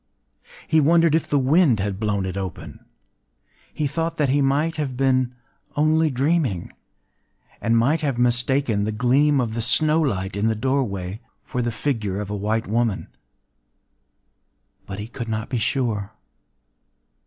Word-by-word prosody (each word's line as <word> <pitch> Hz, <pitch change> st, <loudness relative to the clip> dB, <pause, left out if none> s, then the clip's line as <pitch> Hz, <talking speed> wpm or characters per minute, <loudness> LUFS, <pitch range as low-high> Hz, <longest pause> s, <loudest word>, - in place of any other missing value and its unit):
He 160 Hz, -, +4 dB
wondered 165 Hz, +1 st, +4 dB
if 160 Hz, -, +1 dB
the 145 Hz, -, +2 dB
wind 135 Hz, -, +3 dB
had 95 Hz, 0 st, -2 dB
blown 105 Hz, -3 st, -1 dB
it 95 Hz, -1 st, -4 dB
open;—he 80 Hz, -, -9 dB
thought 165 Hz, +4 st, -2 dB
that 145 Hz, -3 st, +1 dB
he 140 Hz, +2 st, +2 dB
might 145 Hz, +4 st, +1 dB
have 135 Hz, -5 st, -3 dB
been 130 Hz, -2 st, +1 dB, 0.4 s
only 155 Hz, +1 st, +3 dB
dreaming, 135 Hz, -, 0 dB, 0.9 s
and 115 Hz, 0 st, +2 dB
might 140 Hz, +8 st, +2 dB
have 140 Hz, -5 st, -1 dB
mistaken 125 Hz, -2 st, +1 dB
the 110 Hz, -, -1 dB
gleam 135 Hz, +6 st, +3 dB
of 115 Hz, -3 st, -1 dB
the 115 Hz, -, -2 dB
snow 155 Hz, +7 st, +3 dB
light 95 Hz, -9 st, -1 dB
in 100 Hz, +2 st, 0 dB
the 110 Hz, -, +1 dB
doorway 110 Hz, -6 st, -2 dB, 0.2 s
for 125 Hz, -, -3 dB
the 120 Hz, 0 st, -1 dB
figure 110 Hz, -6 st, -2 dB
of 105 Hz, -1 st, -5 dB
a -, -, -2 dB
white 110 Hz, +3 st, -1 dB
woman: 115 Hz, -1 st, -1 dB, 1.8 s
but 95 Hz, -, -6 dB
he 105 Hz, +1 st, -6 dB
could 115 Hz, -1 st, -6 dB
not 110 Hz, 0 st, -3 dB
be 125 Hz, -, -1 dB
sure. 110 Hz, -4 st, -1 dB
120 Hz, 150 wpm, -23 LUFS, 105-145 Hz, 1.8 s, He